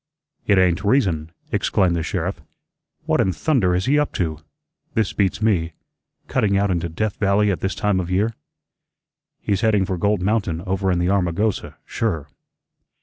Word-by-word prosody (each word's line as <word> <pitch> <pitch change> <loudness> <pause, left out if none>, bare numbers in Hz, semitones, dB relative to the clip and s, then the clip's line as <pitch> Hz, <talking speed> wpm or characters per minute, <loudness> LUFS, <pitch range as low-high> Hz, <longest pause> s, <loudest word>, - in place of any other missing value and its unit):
"It 100 - +4
ain't 90 -1 +3
reason," 90 - +1 0.2
exclaimed 90 -3 +1
the 85 - -1
sheriff. - - -3 0.6
"What - - +2
in 95 - +2
thunder 100 - +1
is 90 - 0
he 145 +3 +3
up 150 - -1
to? 80 -4 -2 0.6
This 110 -3 +1
beats 100 +1 0
me. 85 -7 +1 0.5
Cutting 100 -2 +1
out 100 0 +1
into 85 -1 -1
Death 100 +6 -2
Valley 100 +1 +2
at 90 - -2
this 95 0 -2
time 105 -2 +1
of 90 -1 -3
year." 100 +5 +1 1.1
"He's 100 -1 0
heading 105 -4 +3
for 95 -1 -3
Gold 100 -1 +1
Mountain 100 -5 0
over 95 +1 -1
in 90 - +1
the 90 +2 +1
Armagosa, 100 +2 0
sure." 85 -11 -2
95 Hz, 165 wpm, -22 LUFS, 90-105 Hz, 1.1 s, It